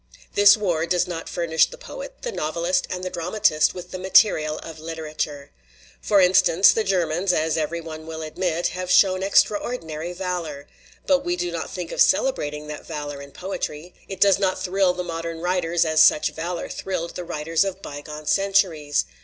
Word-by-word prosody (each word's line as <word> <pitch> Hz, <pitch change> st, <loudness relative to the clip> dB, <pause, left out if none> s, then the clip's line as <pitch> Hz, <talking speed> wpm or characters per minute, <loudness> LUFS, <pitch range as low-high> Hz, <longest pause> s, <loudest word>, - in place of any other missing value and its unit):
"This 205 Hz, +1 st, +7 dB
war 170 Hz, -6 st, -1 dB
does 180 Hz, 0 st, +1 dB
not 165 Hz, -2 st, -6 dB
furnish 165 Hz, -2 st, +2 dB
the -, -, -12 dB
poet, -, -, -10 dB
the 485 Hz, -, -3 dB
novelist, 170 Hz, -, -1 dB
and 180 Hz, 0 st, -4 dB
the 185 Hz, -, -4 dB
dramatist 170 Hz, -3 st, +1 dB
with 180 Hz, -, -9 dB
the 185 Hz, -, -5 dB
material 180 Hz, -5 st, +3 dB
of 160 Hz, -1 st, -9 dB
literature. 155 Hz, -3 st, -5 dB, 0.5 s
For 205 Hz, -, +3 dB
instance, 185 Hz, 0 st, +5 dB
the 220 Hz, -, 0 dB
Germans, 180 Hz, -1 st, 0 dB
as 160 Hz, -2 st, 0 dB
every 160 Hz, +2 st, -2 dB
one 160 Hz, -1 st, -9 dB
will 160 Hz, 0 st, -6 dB
admit, 170 Hz, +2 st, -1 dB
have 185 Hz, 0 st, -5 dB
shown 185 Hz, 0 st, +4 dB
extraordinary 190 Hz, -5 st, 0 dB
valor. 175 Hz, -6 st, -4 dB, 0.4 s
But 280 Hz, -2 st, +2 dB
we 175 Hz, 0 st, -1 dB
do 175 Hz, 0 st, -3 dB
not 170 Hz, -1 st, -4 dB
think 180 Hz, -2 st, -6 dB
of -, -, -1 dB
celebrating 150 Hz, -, +1 dB
that 150 Hz, 0 st, -7 dB
valor 145 Hz, -3 st, -6 dB
in 140 Hz, -, -10 dB
poetry; 180 Hz, -2 st, -6 dB
it 195 Hz, -, -7 dB
does 195 Hz, -1 st, +5 dB
not 185 Hz, -2 st, 0 dB
thrill 185 Hz, 0 st, +1 dB
the 180 Hz, -, -3 dB
modern 165 Hz, -1 st, -5 dB
writers 175 Hz, -1 st, 0 dB
as 160 Hz, -1 st, +3 dB
such 150 Hz, -, +5 dB
valor 170 Hz, +2 st, -4 dB
thrilled 170 Hz, -3 st, -4 dB
the 180 Hz, -, -5 dB
writers 165 Hz, +1 st, 0 dB
of 195 Hz, 0 st, -5 dB
bygone 150 Hz, +1 st, -8 dB
centu 195 Hz, +2 st, +3 dB
ries. 145 Hz, -2 st, -1 dB
175 Hz, 180 wpm, -23 LUFS, 160-190 Hz, 0.5 s, This